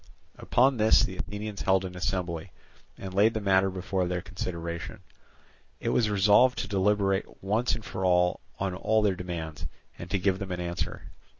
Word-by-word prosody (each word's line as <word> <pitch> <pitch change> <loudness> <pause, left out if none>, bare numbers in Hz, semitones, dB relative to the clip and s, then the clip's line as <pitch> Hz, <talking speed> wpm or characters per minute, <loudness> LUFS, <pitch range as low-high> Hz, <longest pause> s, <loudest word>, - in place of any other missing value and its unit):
Upon 130 +1 +3
this 110 0 +5
the 95 - -3
Athenians 105 0 -5
held 95 0 +2
an 90 -1 -7
assembly, 90 -2 -3 0.5
and 95 -1 -7
laid 105 +4 +4
the - - 0
matter 95 -1 +3
before 95 0 -2
their 90 0 -1
consideration. 85 +1 -5 0.8
It - - -2
was 110 -3 +2
resolved 105 +5 +4
to - - -2
deliberate 100 -1 0
once 110 +4 +1
for 110 -4 -5
all 90 -1 +3 0.2
on 95 -1 -2
all 110 +4 +1
their 100 -2 +3
demands, 85 -4 -5 0.3
and 85 - -7
to 100 - +1
give 95 0 +1
them 95 -1 -5
an 90 - -3
answer. 85 0 -4
95 Hz, 170 wpm, -28 LUFS, 90-105 Hz, 0.8 s, this